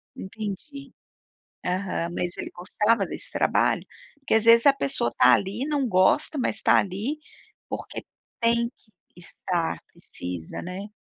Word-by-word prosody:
Entendi. 220 +8 -7 0.7
Aham, 180 -2 -1
mas 175 0 -2
ele - - -5
gostava 210 +4 +1
desse - - -5
trabalho? - - +1 0.3
Porque 275 - -2
às 220 0 +3
vezes 230 0 +7
a 280 - +8
pessoa 135 - -1
tá 125 0 +7
ali, 200 - 0
não 290 -3 0
gosta, 190 - +3
mas 245 -5 -1
tá - - +5
ali 205 +10 -1 0.5
porque - - -6 0.3
tem 235 0 +2
que 215 - -31 0.2
estar, 170 - -3
precisa, 90 -2 -7
né. 185 +3 -6
200 Hz, 135 wpm, -25 LUFS, 180-235 Hz, 0.7 s, a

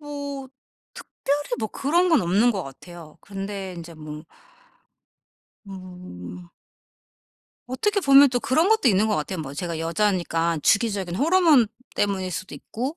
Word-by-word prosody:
뭐 285 -2 -6 0.5
특별히 290 +1 -3
뭐 220 -1 -2
그런 340 - +1
건 315 -8 +4
없는 200 +8 +3
것 195 -6 -2
같아요. 160 +3 -12
근데 195 -1 -6
인제 170 0 -9
뭐 155 -1 -9 1.4
음. 180 - -10 1.2
어떻게 400 +12 0
보면 275 -3 +7
또 245 -1 0
그런 315 - +2
것도 440 - +4
있는 205 +1 +3
것 210 - +1
같아요. 160 +4 -3
뭐 140 -2 -7
제가 170 +1 -4
여자니까 170 -2 0
주기적인 200 -5 +1
호르몬 315 - +4 0.3
때문일 190 -2 -1
수도 185 +2 -6
있고 260 +8 -5
200 Hz, 265 characters per minute, -24 LUFS, 170-275 Hz, 1.4 s, 보면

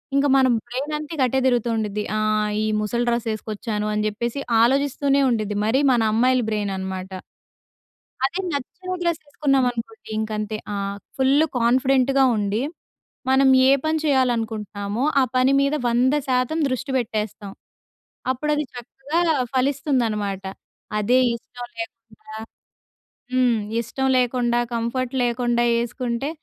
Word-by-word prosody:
ఇంకా 280 +1 +3
మన 260 -1 +5 0.2
బ్రైన్ 265 +5 -4
అంత 300 0 -6
ఇంక 275 - +1
అటే 265 +2 0
తిరుగుతూ 240 -2 +1
ఉండుద్ది! 210 -1 -2
ఆహ్, 215 0 +1
ఈ - - 0 0.2
ముసలి 235 +3 -1
డ్రెస్ 235 0 -1
ఎసుకొచ్చాను 215 0 -4
అని 210 0 0
చెప్పేసి 235 +5 -3 0.2
ఆలోచిస్తూనే 275 +2 +2
ఉండుద్ది. 215 -3 -1
మరీ 255 +6 +2
మన 240 -2 +3
అమ్మాయిల 250 +2 +3
బ్రెయిన్ 205 -2 -1
అనమాట. 190 0 -5 1.2
అదే 345 +8 -3
నచ్చిన 365 +7 -5
డ్రెస్ 340 -1 0
ఎసుకున్నామనుకోండి 270 - -1
ఇంకంతే 215 0 -3 0.2
ఆహ్, 200 0 -3 0.2
ఫుల్ 275 +4 +4
కాన్ఫిడెంట్‌గా 265 +2 +3
ఉండి 205 +3 -1 0.7
మనం 265 0 +5 0.2
ఏ - - +7
పని 315 0 +1
చేయాలనుకుంటున్నామో 225 -5 0 0.2
ఆ - - +5
పని 255 +1 +4
మీద 280 +2 +1
100% 255 +3 +1
దృష్టి 255 +2 -3
పెట్టేస్తాం! 215 -3 -3 0.8
అప్పుడది 300 +3 -1
చక్కగా 270 +6 -4 0.4
ఫలిస్తుందనమాట. 245 -7 0 0.6
అదే 230 +5 +2 0.2
ఇష్టం 245 +1 -9
లేకుండా 225 -1 -9 1.0
హ్మ్. 250 -3 +3 0.2
ఇష్టం 265 +3 -2
లేకుండా 245 -1 +1 0.2
కంఫర్ట్ 240 +2 -2
లేకుండా 240 0 +1 0.2
ఎసుకుంటే 240 +2 -3
245 Hz, 120 wpm, -22 LUFS, 215-270 Hz, 1.2 s, ఏ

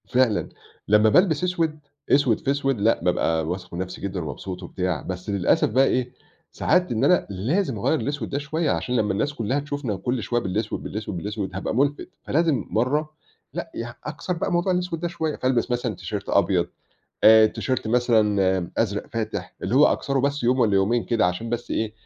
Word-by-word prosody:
فعلًا. 115 0 +1 0.4
لمّا 105 +1 +5
بالبس 170 - +3
أسود، 165 -4 0 0.3
أسود 135 -6 +3
في 135 - 0
أسود 135 -4 0
لأ، 115 +3 +2
بابقى 80 -3 +1
واثق 90 +1 -5
من 85 - -4
نفسي 95 0 -5
جدًا 95 -1 -3
ومبسوط 90 +5 -6
وبتاع، 90 -2 -2
بس 90 +1 -6
للأسف 100 -3 +2
بقي 130 +5 +4
إيه، 125 -1 0 0.4
ساعات 180 -4 +1
إن 115 +1 0
أنا 175 +5 +3
لازم 125 - -1
أغيّر 160 +9 +1
الأسود 145 -5 -3
ده 140 - -2
شوية 155 +2 -1
عشان 125 - -1
لمّا 105 -4 +1
الناس 125 +9 -1
كلها 130 +2 -1
تشوفنا 145 -6 -3
كل 120 +4 -2
شوية 120 +5 0
بالأسود، 105 +3 -3
بالأسود، 105 -3 -5
بالأسود، 100 0 -4
هابقى 95 - -3
ملفت. 145 +3 0
فلازم 160 -3 +1
مرة 145 +7 0 0.4
لأ، - - -5
يع 120 +1 -5
أكسر 180 - -4
بقى 170 - -2
موضوع 175 +2 +1
الأسود 180 -2 -1
ده 175 - -1
شوية، 160 -3 -3
فألبس 130 -1 0
مثلًا 120 -3 -1
تيشيرت - - -5
أبيض، - - +2 0.6
آآ، 110 0 +9
تيشيرت 130 +1 -2
مثلًا 105 -6 +2
أزرق 105 -2 0
فاتح 110 -1 -4
اللي 95 - -1
هو 145 +3 +7
أكسره 140 -1 0
بس 140 +1 0
يوم 125 +2 +2
والّا 105 -4 +3
يومين 105 +5 +2
كده 115 -6 +2
عشان 90 +6 -3
بس 120 0 -3
إيه، 110 -1 -1
120 Hz, 190 wpm, -24 LUFS, 100-145 Hz, 0.6 s, آآ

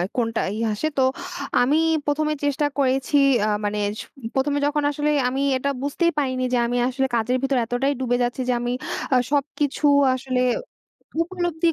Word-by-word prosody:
কোনটা 230 -2 0
ই - - -4
আসে? 215 +9 -1
তো 265 - +4 0.6
আমি 280 +5 +3 0.3
১ম 295 +1 0
এ - - -4
চেষ্টা 290 +1 +1
করেছি 270 +1 +2 0.3
আ - - +1 0.2
মানে 210 0 -1 0.2
সু - - -11 0.3
১ম 270 +2 +1
এ - - +1
যখন 295 0 0
আসলে 295 +1 -1 0.2
আমি 265 +2 -1 0.2
এটা 280 +2 -1
বুঝতেই 335 +5 +1
পারিনি 255 -2 -1
যে 250 - +3
আমি 245 - -1
আসলে 265 +1 0
কাজের 235 +3 +1
ভিতর 270 -1 +1
এতটাই 255 +4 0
ডুবে 245 -1 +1
যাচ্ছি 245 +2 -2
যে - - +3
আমি 240 0 -2 0.4
আ - - +6
সবকিছু 290 0 0 0.3
আসলে 255 -1 -1 0.7
ত - - -8
উপলব্ধিই 345 -2 -1
270 Hz, 180 wpm, -23 LUFS, 250-295 Hz, 0.7 s, আ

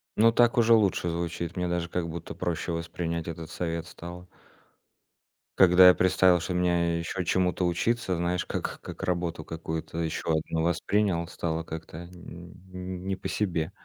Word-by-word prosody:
Ну, 115 +2 +5
так 120 +1 +3
уже 115 0 +5
лучше 100 -5 +3
звучит. 85 +1 -3
Мне 90 - 0
даже 85 -1 -2
как 85 -1 -2
будто 85 +1 -6
проще 85 -1 -2
воспринять 85 0 -3
этот 85 -1 -6
совет 85 -1 -3
стало. 85 +1 -10 1.3
Когда 90 0 +8
я 90 - +9
представил, 95 -1 +4
что 90 +2 -3
мне 85 -1 +1
ещё 90 +2 -3
чему-то 90 0 +1
учиться, 95 +3 0
знаешь, 85 +1 -1
как - - -4
как - - -9
работу 85 -3 -1
какую-то 80 0 -5
ещё 80 0 -2
одну 80 +1 -1
воспринял, 85 +1 +1
стало 80 -1 -3
как-то 80 +1 -8
нь 85 0 -11 0.5
не 95 - 0
по - - -6
себе. 85 -4 -1
85 Hz, 155 wpm, -27 LUFS, 85-90 Hz, 1.3 s, я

